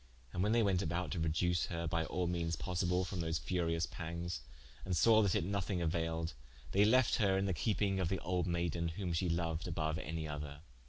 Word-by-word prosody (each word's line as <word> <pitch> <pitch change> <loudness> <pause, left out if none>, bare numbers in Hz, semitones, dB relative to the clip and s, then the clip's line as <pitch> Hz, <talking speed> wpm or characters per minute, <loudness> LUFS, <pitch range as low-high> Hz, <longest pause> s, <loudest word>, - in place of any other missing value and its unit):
And 90 - -1
when 105 +3 +2
they 115 0 +4
went 95 -3 +2
about 85 0 -2
to 90 - -2
reduce 85 +2 +1
her 85 -1 -3
by 80 0 0
al 90 +2 -1
meanes 85 -1 -1
possible 90 +2 0
from 95 -1 -4
those 80 -1 0
furious 85 -2 0
panges, 85 0 -5 0.4
and 90 -2 -1
saw 110 +5 +6
that 100 -4 +2
it - - +2
nothing 100 0 -1
auailed, 80 -1 -1 0.4
they 100 +2 +5
lefte 130 +2 +4
her 100 -4 +3
in 95 - +1
the 95 - +1
keeping 100 +2 0
of 90 -3 +1
the 95 - 0
olde 90 0 0
maiden, 85 -1 0
whom 85 +1 -3
she 85 +2 0
loued 85 -1 -1
aboue 80 -2 -1
any 80 0 -4
other. 75 -1 -6
85 Hz, 210 wpm, -35 LUFS, 80-95 Hz, 0.4 s, saw